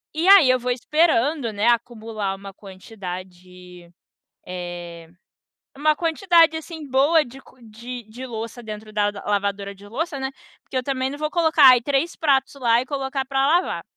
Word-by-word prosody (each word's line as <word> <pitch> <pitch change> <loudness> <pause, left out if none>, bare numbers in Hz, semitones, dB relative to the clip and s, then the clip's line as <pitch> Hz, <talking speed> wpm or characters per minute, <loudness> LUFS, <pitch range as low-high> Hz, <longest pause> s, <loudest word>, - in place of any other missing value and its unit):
E 335 +4 0
aí 385 -10 +8
,eu 255 - +4
vou 250 +1 -2
esperando, 285 -2 +1
né, 205 +3 0
acumular 225 -4 -1
uma 195 0 -11
quantidade, 180 -3 -10 0.6
eh, 175 -2 -7 0.7
uma 305 +1 +2
quantidade 330 -1 +3
assim 320 -1 -8
boa 295 +5 +4
de 260 +2 -13
co 260 - -20
de 235 +2 -9
de 250 +4 -8
louça 230 0 -7
dentro 215 0 -8
da 205 -1 +1 0.2
lavadora 200 -1 -2
de 200 +1 -15
louça, 285 +5 -4
né, 265 0 -2 0.3
porque - - -12
eu 255 - -1
também 265 -1 -2
não 285 - -7
vou 305 0 -2
colocar, 320 -5 +5
ai, 250 -1 +7
3 285 +6 -1
pratos 280 -4 +1
lá 240 -3 +2
e - - -6
colocar 270 -1 -3
para 270 0 0
lavar. 345 +4 +1
250 Hz, 170 wpm, -22 LUFS, 205-290 Hz, 0.7 s, aí